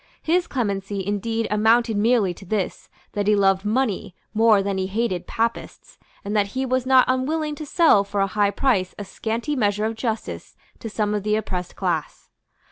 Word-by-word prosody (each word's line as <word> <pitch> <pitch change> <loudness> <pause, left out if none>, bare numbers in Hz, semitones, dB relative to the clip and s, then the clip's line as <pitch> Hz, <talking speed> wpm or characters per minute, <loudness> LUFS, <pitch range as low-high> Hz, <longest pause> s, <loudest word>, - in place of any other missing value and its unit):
His 345 +2 +1
clemency 200 -5 -2
indeed 225 +3 -1
amounted 225 +2 +3
merely 210 -3 +2
to 185 - -14
this, 195 0 -3 0.2
that 205 -1 -2
he 210 - +5
loved 195 -1 +3
money 215 -4 -1 0.2
more 220 -2 +4
than 195 -1 -2
he 190 - -1
hated 195 -3 -2
Papists, 230 +1 -3 0.3
and 205 +2 -3
that 205 -1 +2
he 265 - 0
was 255 0 0
not 260 -1 +6
unwilling 300 +4 0
to 300 0 -7
sell 315 - +4
for 200 0 -4
a - - +4
high 200 +1 +1
price 200 -4 0
a 205 - -6
scanty 230 +8 -3
measure 210 -4 +1
of 225 - -1
justice 225 -1 -4 0.2
to 225 - -6
some 210 -1 -1
of 210 - -1
the 210 +1 +1
oppressed 180 -4 -4
class. 175 -5 -3
215 Hz, 185 wpm, -23 LUFS, 200-235 Hz, 0.3 s, not